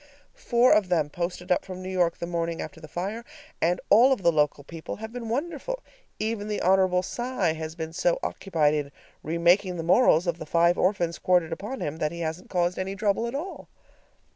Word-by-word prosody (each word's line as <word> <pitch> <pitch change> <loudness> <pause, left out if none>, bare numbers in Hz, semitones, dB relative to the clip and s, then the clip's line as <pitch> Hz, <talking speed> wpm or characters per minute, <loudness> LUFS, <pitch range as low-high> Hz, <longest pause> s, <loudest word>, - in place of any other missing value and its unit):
Four 250 - +3
of 210 -3 +2
them 155 -5 +1
posted 180 +2 -4
up 180 - +3
from 185 -1 -8
New 185 - -5
York 175 -2 +1
the - - -4
morning 170 -1 -2
after 160 - -7
the 155 - -10
fire, 195 +9 -4 0.4
and 175 +2 +2
all 240 +6 +7
of 255 -8 0
the 170 - +5
local 150 -2 +1
people 165 +2 -7
have 220 +2 -8
been 240 -2 -6
wonderful. 340 - -3 0.3
Even 215 -1 -2
the 210 -1 -2
Hon. 185 -1 +3
Cy 240 -6 -1
has 160 0 -6
been 160 -1 -5
so 170 +1 +1
occupied 160 -6 +1
in 145 -2 -2 0.3
remaking 175 +4 +2
the 165 - -3
morals 175 -1 +4
of 170 -1 -1
the - - -6
five 170 +2 +3
orphans 175 -3 0
quartered 175 -3 +2
upon 210 +10 -6
him 150 +2 -3
that 155 -2 -1
he 170 0 -6
hasn't 160 +2 -4
caused 175 0 0
any 190 +1 -3
trouble 205 +3 0
at 235 - -5
all. 345 +7 -6
180 Hz, 205 wpm, -26 LUFS, 165-210 Hz, 0.4 s, all